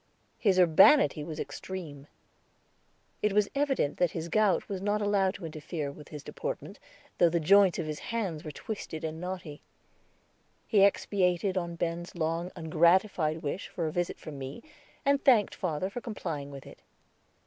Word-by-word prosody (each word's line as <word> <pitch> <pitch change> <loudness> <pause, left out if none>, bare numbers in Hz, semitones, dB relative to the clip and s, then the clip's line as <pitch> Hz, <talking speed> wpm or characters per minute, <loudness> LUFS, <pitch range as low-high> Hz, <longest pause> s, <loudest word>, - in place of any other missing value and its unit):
His 195 -4 +3
urbanity 185 - +6
was 155 0 -6
extreme; 155 -7 -7 1.1
it 210 -1 +1
was 210 0 +2
evident 275 - 0
that 180 -3 +2
the 165 0 -4
gout 210 +1 +2
was 195 -2 -4
not 205 +1 0
allowed 200 -2 +1
to 175 - -8
interfere 155 -1 -5
with 150 +1 -13
his 150 -2 -8
deportment, - - -6 0.4
though 175 - +6
the 170 +1 +1
joints 195 +3 +5
of 165 - -2
his 155 -1 -4
hands 195 -10 -3
were 155 - -6
twisted 160 0 -6
and 160 +1 -4
knotty. 180 -5 -6 1.0
He 205 -4 +4
expatiated 190 -1 +2
upon 170 -2 -2
Ben's 170 +1 -3
long 165 +2 -2
ungratified 165 0 +2
wish 150 +6 -3
for 170 - -4
a 155 - -1
visit 175 -1 -1
from 145 -3 -9
me, 135 - -7 0.4
and 280 0 +3
thanked 235 -6 +4
father 175 0 -2
for 220 +5 -6
complying 165 - -5
with 140 -1 -10
it. - - -13
175 Hz, 160 wpm, -29 LUFS, 155-200 Hz, 1.1 s, urbanity